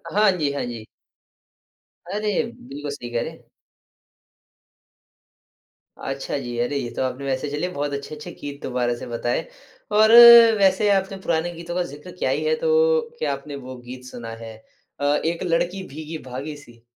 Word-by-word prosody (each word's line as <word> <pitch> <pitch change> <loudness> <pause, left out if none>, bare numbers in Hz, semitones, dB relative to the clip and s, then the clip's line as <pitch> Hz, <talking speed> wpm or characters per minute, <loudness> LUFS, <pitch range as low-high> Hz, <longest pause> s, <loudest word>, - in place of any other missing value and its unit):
हाँ 210 0 +5
जी, 155 -6 -1
हाँ 140 - -2
जी। 115 -3 -7 1.2
अरे! 210 0 0 0.2
बिल्कुल 145 +1 -6
सही 125 -4 -7
कह 120 -1 0
रहे - - -4
हैं। - - -17 2.5
अच्छा, 135 +1 -4
जी। 120 -3 -5
अरे, 125 +4 -1
ये 120 -3 -3
तो - - -2
आपने 130 +2 -3
वैसे 135 +2 -2
चलिए 150 +5 -2
बहुत 145 -4 -3
अच्छे-अच्छे 150 +2 -6
गीत 145 0 -8
दुबारा 125 -1 0
से - - -8
बताए 120 +3 -1 0.6
और 220 0 +6 0.5
वैसे 195 +2 +4
आपने 195 0 0
पुराने 170 +1 0
गीतों 170 +1 -7
का 180 - +1
ज़िक्र 150 +2 -10
किया 180 - -2
ही - - 0
है 470 - +2
तो 475 0 +3 0.2
क्या - - 0
आपने 140 +1 -7
वो 130 0 -7
गीत 125 +1 -10
सुना 120 -2 -8
है? 115 -1 -8 0.4
अ, - - -4
एक 160 +4 0
लड़की 175 +2 0
भीगी-भागी 150 -1 -7
सी? 120 -5 -17
145 Hz, 165 wpm, -23 LUFS, 130-180 Hz, 2.5 s, और